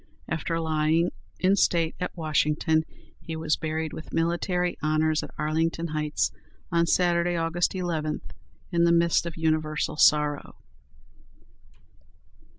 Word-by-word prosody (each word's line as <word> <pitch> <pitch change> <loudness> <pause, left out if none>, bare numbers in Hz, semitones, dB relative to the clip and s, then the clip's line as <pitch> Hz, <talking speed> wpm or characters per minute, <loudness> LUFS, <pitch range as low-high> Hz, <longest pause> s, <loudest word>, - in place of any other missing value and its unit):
After 165 +1 -2
lying 160 +1 +1 0.3
in 190 +2 +4
state 170 -3 +2
at 180 - -4
Washington, 155 0 +1 0.3
he 165 - -6
was 160 -1 0
buried 160 0 -3
with 160 - -9
military 175 +2 0
honors 155 +1 +1
at - - -7
Arlington 160 +2 -1
Heights, 150 -1 -1 0.4
on 170 0 +2
Saturday, 175 0 +2
August 170 +2 0
11, 165 -4 -2 0.5
in 170 -1 +2
the 170 - +4
midst 170 0 +3
of 170 - -7
universal 155 -2 0
sorrow. 150 -1 +3
160 Hz, 120 wpm, -26 LUFS, 155-170 Hz, 0.5 s, in